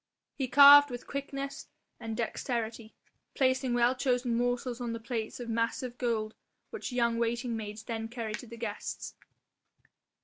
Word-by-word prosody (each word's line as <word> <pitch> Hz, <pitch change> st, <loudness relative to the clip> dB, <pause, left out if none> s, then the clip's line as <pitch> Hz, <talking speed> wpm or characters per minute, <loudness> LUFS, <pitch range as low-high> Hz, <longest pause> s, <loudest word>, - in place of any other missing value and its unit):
He 265 Hz, -, -2 dB
carved 285 Hz, +2 st, +9 dB
with 245 Hz, -1 st, -7 dB
quickness 275 Hz, 0 st, -5 dB, 0.3 s
and 225 Hz, -2 st, -5 dB
dexterity, 230 Hz, -1 st, -3 dB, 0.4 s
placing 260 Hz, -2 st, +1 dB
well 240 Hz, +1 st, +4 dB
chosen 250 Hz, -2 st, 0 dB
morsels 245 Hz, 0 st, -1 dB
on 235 Hz, -1 st, -2 dB
the 230 Hz, -, -4 dB
plates 225 Hz, -1 st, -4 dB
of 240 Hz, -, -6 dB
massive 230 Hz, +2 st, -2 dB
gold 225 Hz, -3 st, -1 dB, 0.4 s
which 450 Hz, -, -5 dB
young 235 Hz, -2 st, +1 dB
waiting 235 Hz, +1 st, -1 dB
maids 215 Hz, 0 st, -6 dB
then 225 Hz, -1 st, -4 dB
carried 225 Hz, -2 st, -5 dB
to 245 Hz, -, -10 dB
the 235 Hz, +1 st, -10 dB
guests. 225 Hz, -3 st, -5 dB
240 Hz, 145 wpm, -30 LUFS, 230-255 Hz, 0.4 s, carved